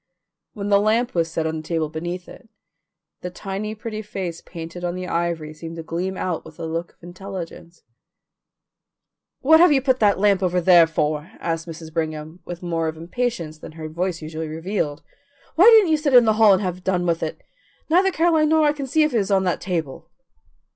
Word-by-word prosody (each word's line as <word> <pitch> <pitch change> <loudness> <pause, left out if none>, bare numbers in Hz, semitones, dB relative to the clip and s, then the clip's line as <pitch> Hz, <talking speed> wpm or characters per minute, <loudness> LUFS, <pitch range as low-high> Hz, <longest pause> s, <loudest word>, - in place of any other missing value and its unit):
When 205 -1 -4
the 200 -1 +5
lamp 230 +4 +1
was 165 -1 0
set 160 0 -2
on 160 0 -2
the - - -5
table 160 0 -2
beneath 175 +4 -5
it, 230 - -14 0.7
the 180 - -4
tiny 200 +3 -5
pretty 215 0 -6
face 185 -5 -5
painted 170 +1 -9
on 175 0 -2
the 185 0 -5
ivory 170 -3 -2
seemed 165 +1 -8
to 165 - -7
gleam 180 +4 -3
out 175 -3 -2
with - - -14
a 165 - -4
look 165 +1 -4
of - - -38
intelligence. 175 -2 -9 1.6
"What 320 +4 +6
have 350 -1 +7
you 280 - +4
put 260 -1 +1
that 205 -2 +3
lamp 200 -1 +3
over 180 -1 +1
there 175 -1 +6
for?" 155 +2 -2
asked 165 0 -3
Mrs. 160 -1 -9
Brigham, 155 0 -4
with 175 0 -7
more 165 -2 -1
of 160 0 -4
impatience 170 -3 -3
than - - -10
her 160 -1 -7
voice 170 +1 -3
usually 160 +1 -5
revealed. 160 -2 -3 0.5
"Why 355 - +5
didn't 440 -7 +7
you 310 - +4
set 290 -3 +1
it - - +11
in 240 - +6
the 220 - +4
hall 215 -2 +8
and 190 +2 +1
have 180 -1 -4
done 180 -2 0
with 170 -1 0
it. 160 - -4 0.5
Neither 365 +5 +4
Caroline 325 -3 +2
nor 315 -1 +4
I 295 - +3
can 280 -2 -5
see 310 +4 +3
if 300 - 0
it 230 - +3
is 200 - -2
on 195 -1 +3
that 180 -2 -1
table." 165 -7 -4
180 Hz, 210 wpm, -22 LUFS, 165-215 Hz, 1.6 s, it